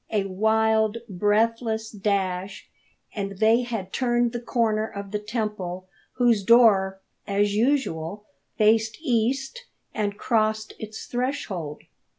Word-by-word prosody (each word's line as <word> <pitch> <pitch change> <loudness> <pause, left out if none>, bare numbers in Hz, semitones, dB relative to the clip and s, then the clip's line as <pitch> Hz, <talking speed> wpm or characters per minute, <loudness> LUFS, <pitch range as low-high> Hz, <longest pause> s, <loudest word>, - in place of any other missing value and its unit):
A 210 -3 +1
wild, 220 +2 +2
breathless 220 +3 0
dash, 195 -2 -2 0.5
and 200 -2 -4
they 220 +3 +4
had 225 -6 -5
turned 240 -2 +1
the 240 - -4
corner 220 -3 0
of 200 -2 -8
the 210 - -1
temple 210 -4 -4 0.3
whose 240 -4 +3
door, 195 -4 +5 0.3
as 205 0 +1
usual, 210 - 0 0.3
faced 220 +1 +3
east 270 - -1 0.3
and 205 -2 -2
crossed 215 -2 0
its 215 0 -7
threshold. 210 - -3
215 Hz, 115 wpm, -25 LUFS, 200-230 Hz, 0.5 s, door